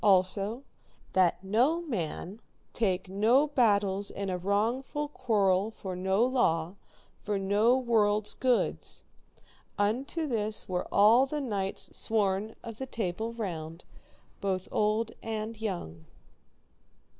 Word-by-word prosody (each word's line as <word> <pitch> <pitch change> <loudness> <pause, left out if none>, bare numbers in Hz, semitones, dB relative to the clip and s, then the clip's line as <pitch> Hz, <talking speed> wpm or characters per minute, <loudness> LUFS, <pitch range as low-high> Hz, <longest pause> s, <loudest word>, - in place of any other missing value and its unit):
Also, 200 +5 +2 0.5
that 185 0 +3
no 250 - +2
man 200 - -4 0.3
take 190 -5 0
no 220 +9 +3
battles 205 -8 +2
in 195 -1 -4
a 180 - -1
wrongful 230 +10 -1
quarrel 205 -8 +1
for 190 -4 -7
no 190 +5 +2
law, 165 -11 +2
nor 190 - -17 0.5
for 210 -1 -1
no 205 +6 +3
world's 215 -4 +2
goods. 255 -2 0 0.7
Unto 255 +10 0
this 220 -5 -1
were 180 -1 -2
all 225 +6 +6
the 300 +2 -3
knights 200 -8 -3
sworn 210 0 0
of 230 -2 -8
the 265 - -4
Table 220 0 -3
Round, 170 -7 -5 0.6
both 190 -1 -2
old 215 +2 +1
and 220 0 -4
young. 85 - -4
210 Hz, 120 wpm, -29 LUFS, 190-235 Hz, 0.7 s, all